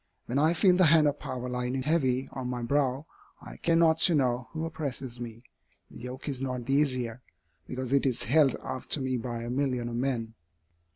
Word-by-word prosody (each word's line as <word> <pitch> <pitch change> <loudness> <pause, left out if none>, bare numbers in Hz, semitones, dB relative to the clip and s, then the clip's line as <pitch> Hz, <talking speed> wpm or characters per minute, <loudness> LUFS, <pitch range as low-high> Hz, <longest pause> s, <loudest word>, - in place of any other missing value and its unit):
When 130 +4 -1
I 160 +3 +3
feel 180 +1 +5
the 185 -2 +6
hand 155 0 +6
of 145 0 +1
power 125 0 -5
lie 125 0 -2 0.2
heavy 135 -5 +1
on 130 -2 -5
my 125 -1 -3
brow, 135 +2 0 0.3
I - - -11
care 165 - +1
not 165 -1 +4
to 170 0 +5
know 125 -3 0
who 160 0 -3
oppresses 135 -6 -5
me; 115 -1 -8 0.5
the - - -11
yoke 125 +4 -7
is 135 -3 -2
not 125 -2 -3
the 135 - 0
easier, 130 -4 0 0.5
because 130 0 -3
it 140 0 +3
is 125 - -1
held 140 +1 +4
out 130 - -5
to - - +2
me 130 -1 -1
by 120 -1 -4
a 120 - -4
million 125 -3 -1
of 115 - -5
men." 120 -3 -2
130 Hz, 210 wpm, -28 LUFS, 125-145 Hz, 0.5 s, the